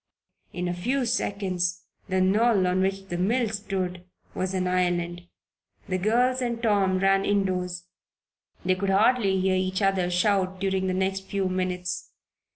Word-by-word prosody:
In 180 0 -3
a 175 - -1
few 245 +9 -1
seconds 185 -5 -1 0.3
the 190 0 +1
knoll 205 +1 +3
on 180 +1 +1
which 195 0 -2
the 175 - -3
mill 225 +5 +1
stood 190 -4 -3 0.3
was 185 +1 -2
an 185 -1 0
island! 175 -1 -1 0.6
The 185 -1 -1
girls 245 +6 +2
and 240 -2 -2
Tom 200 -5 +2
ran 195 +1 +3
indoors. 180 -3 -1 0.8
They 185 - +3
could 195 +1 -2
hardly 200 -1 +3
hear 190 0 +2
each 185 +1 0
other 190 -2 +2
shout 185 +1 +1
during 190 -1 0
the 185 - 0
next 190 0 -1
few 195 -2 -1
minutes. 180 -1 -3
190 Hz, 155 wpm, -26 LUFS, 180-200 Hz, 0.8 s, knoll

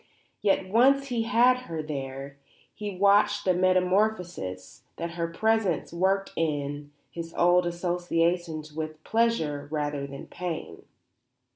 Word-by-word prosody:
Yet, 195 -2 +2
once 270 +7 +4
he 240 -2 0
had 245 +3 +4
her 160 -2 -4
there, 140 -1 -6 0.3
he 205 -3 -6
watched 205 +1 +4
the 185 - +4
metamorphosis 180 - 0 0.2
that 170 0 -4
her 170 0 -2
presence 205 -2 0
worked 195 +3 +1
in 145 -2 -2 0.2
his 165 -1 -7
old 175 0 +4
associations 175 -2 -1
with 155 0 -5
pleasure 160 -12 0
rather 145 -2 -2
than 140 0 -9
pain. 175 -3 -6
175 Hz, 120 wpm, -27 LUFS, 150-200 Hz, 0.3 s, once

